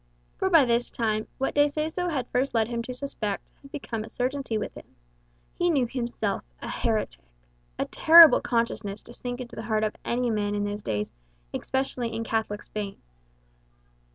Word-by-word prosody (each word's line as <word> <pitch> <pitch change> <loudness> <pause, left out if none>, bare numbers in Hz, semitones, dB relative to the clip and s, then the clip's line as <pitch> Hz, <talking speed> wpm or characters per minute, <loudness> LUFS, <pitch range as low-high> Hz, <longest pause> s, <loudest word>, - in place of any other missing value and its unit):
For 380 - +2
by 325 -7 +6
this 240 0 +1
time, 215 -2 -1
what 270 - -1
De 290 0 +5
Seso 315 +4 -1
had 270 -7 -1
first 255 0 0
led 220 -1 +3
him 235 -1 -2
to 240 - -6
suspect, 225 -7 -4
had 275 - -15
become 235 -7 -4
a 220 - -10
certainty 255 -2 -2
with 210 - -4
him. - - -14 0.6
He 350 - +1
knew 280 -7 +3
himself 235 -4 -2 0.2
a - - -7
heretic - - -1 0.6
a - - 0
terrible 330 -1 +8
consciousness 225 -4 -1
to 240 - -12
sink 245 +1 -5
into 240 - -8
the - - -5
heart 215 -1 +1
of 215 - -1
any 245 0 0
man 205 -1 0
in 205 - 0
those 205 0 -3
days, 105 - -2 0.4
especially 260 -3 -2
in 225 +1 -2
Catholic 220 -2 -2
Spain. 205 -2 -5
235 Hz, 180 wpm, -27 LUFS, 215-270 Hz, 0.6 s, terrible